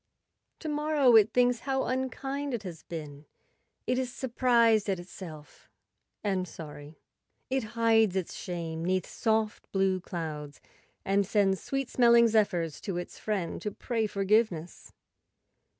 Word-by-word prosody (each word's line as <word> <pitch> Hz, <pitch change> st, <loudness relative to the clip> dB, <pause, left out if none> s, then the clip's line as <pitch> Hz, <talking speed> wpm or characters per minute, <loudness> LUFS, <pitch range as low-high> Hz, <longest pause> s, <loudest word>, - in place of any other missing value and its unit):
To 315 Hz, -, -5 dB
morrow 295 Hz, -4 st, +3 dB
it 215 Hz, 0 st, +6 dB
thinks 245 Hz, -1 st, +3 dB
how 265 Hz, +1 st, -1 dB
unkind 270 Hz, +2 st, -2 dB
it 220 Hz, -, -6 dB
has 170 Hz, -4 st, -7 dB
been; 150 Hz, -3 st, -8 dB, 0.6 s
it 250 Hz, +1 st, +1 dB
is 255 Hz, -1 st, -2 dB
surprised 235 Hz, -4 st, +2 dB
at 190 Hz, -2 st, 0 dB
itself 165 Hz, -5 st, -11 dB, 0.5 s
and 190 Hz, -3 st, 0 dB
sorry. 150 Hz, -1 st, -10 dB, 0.5 s
It 265 Hz, -1 st, +1 dB
hides 225 Hz, -4 st, +4 dB
its 185 Hz, -3 st, -2 dB
shame 165 Hz, -3 st, -5 dB
'neath 185 Hz, +1 st, 0 dB
soft 220 Hz, -1 st, -1 dB
blue 190 Hz, -1 st, +2 dB
clouds 155 Hz, -6 st, -6 dB, 0.5 s
and 200 Hz, +1 st, +3 dB
sends 195 Hz, -2 st, +1 dB
sweet 275 Hz, -1 st, -2 dB
smelling 235 Hz, -1 st, +5 dB
zephyrs 180 Hz, -8 st, +1 dB
to 190 Hz, -4 st, -3 dB
its 175 Hz, -, -6 dB
friend 200 Hz, -6 st, -2 dB
to 210 Hz, -, -2 dB
pray 225 Hz, 0 st, -2 dB
forgiveness. 195 Hz, -4 st, 0 dB
205 Hz, 135 wpm, -29 LUFS, 175-240 Hz, 0.6 s, it